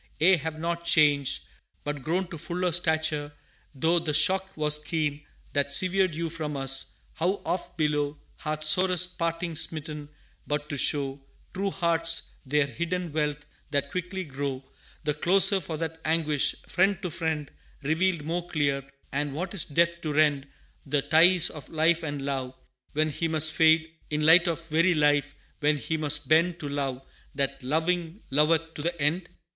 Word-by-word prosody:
ye 185 +4 +6
have 160 -1 -5
not 170 +1 -3
changed, 150 -5 +3 0.4
but 145 -1 -4
grown 175 +7 -1
To 170 - -6
fuller 180 +3 -2
stature; 155 -3 0 0.4
though 165 +6 +2
the 155 -3 -2
shock 190 +4 +2
was 150 0 +3
keen 150 -2 -2 0.3
That 140 0 0
severed 185 +2 +3
you 165 0 -3
from 155 -3 -4
us, 135 0 +2 0.2
how 180 +5 -1
oft 180 - -3
below 150 -2 0 0.2
Hath 155 0 -4
sorest 180 +2 +3
parting 165 0 -2
smitten 150 -2 -1 0.4
but 150 0 -3
to - - -3
show 140 0 +1 0.3
True 195 +1 -1
hearts 165 -3 +2 0.2
their 150 +1 +2
hidden 170 +5 -4
wealth 150 -1 -2 0.2
that 140 -1 -2
quickly 185 +1 -4
grow 140 -3 -5 0.4
The 150 -1 0
closer 190 +5 +4
for 160 -1 -5
that 160 0 -5
anguish, 155 -3 +1
friend 190 +1 +2
to 180 - -3
friend 155 -3 -3 0.3
Revealed 160 +2 0
more 170 +3 -3
clear, 140 -3 0 0.3
and 140 0 -2
what 180 +7 -4
is 195 - +1
Death 170 +3 +1
to 155 -3 -3
rend 145 -2 +2 0.4
The 140 0 -1
ties 175 +2 +5
of 150 - -10
life 165 +1 +2
and 145 -3 -4
love, 135 -2 -3 0.4
when 155 +1 +1
He 165 +4 -2
must 155 -1 +2
fade 160 0 +3 0.2
In 150 0 -1
light 170 +3 +7
of 165 -1 -3
very 165 +3 +3
Life, 145 -1 +2 0.2
when 150 0 +2
He 160 +3 -3
must 145 -2 -1
bend 170 +3 +3
To 150 - -4
love, 135 -2 -3 0.3
that, 135 0 -2
loving, 165 - -1
loveth 160 +3 +2
to - - -6
the 170 +2 -3
end? 160 +5 0
155 Hz, 165 wpm, -27 LUFS, 145-170 Hz, 0.4 s, light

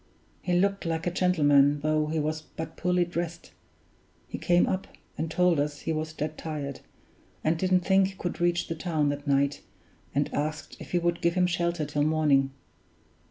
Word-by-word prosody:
He 180 - -1
looked 195 +3 +2
like 165 -1 -2
a 175 - +1
gentleman, 145 -6 +4
though 155 0 +1
he 160 +1 -2
was 155 +1 -1
but 160 +1 -8
poorly 180 0 +1
dressed. 170 -1 -5 0.8
He - - -6
came 175 0 +3
up, 190 0 -2 0.3
and 160 - -3
told 175 -1 +3
us 145 0 -2
he 160 - -1
was 155 0 -3
dead 155 0 -4
tired, 145 -4 -5 0.6
and 160 +2 +2
didn't 185 +2 +2
think 190 +1 +4
he 195 - -9
could 175 -2 -4
reach 175 0 +1
the - - -2
town 155 -3 0
that 145 0 -4
night 140 0 +2 0.5
and 145 +1 0
asked 150 +1 -3
if - - -10
we - - +4
would 170 0 0
give 170 +1 +2
him 180 -1 +3
shelter 170 -2 0
till 145 0 -2
morning. 150 -3 +3
160 Hz, 185 wpm, -27 LUFS, 150-175 Hz, 0.8 s, gentleman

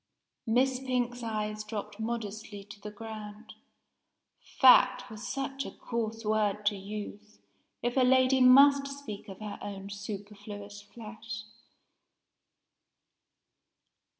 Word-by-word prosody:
Miss 255 +3 +3
Pink's 245 -2 -1
eyes 215 -2 -3
dropped 210 -1 -6
modestly 220 -2 -4
to 200 0 -13
the 210 - -6
ground 215 0 -9 1.0
"fat" 255 -1 +7
was 215 -1 -7
such 275 0 -3
a - - -6
coarse 225 -1 -4
word 210 -1 +1
to 205 - +3
use, 210 +1 -7 0.5
if 240 0 0
a - - +4
lady 260 +1 +5
must 275 +2 +7
speak 275 -8 -8
of 190 - -8
her 210 -1 -6
own 200 0 -6
superfluous 205 0 -7
flesh! 215 0 -8
215 Hz, 110 wpm, -30 LUFS, 205-250 Hz, 1.0 s, fat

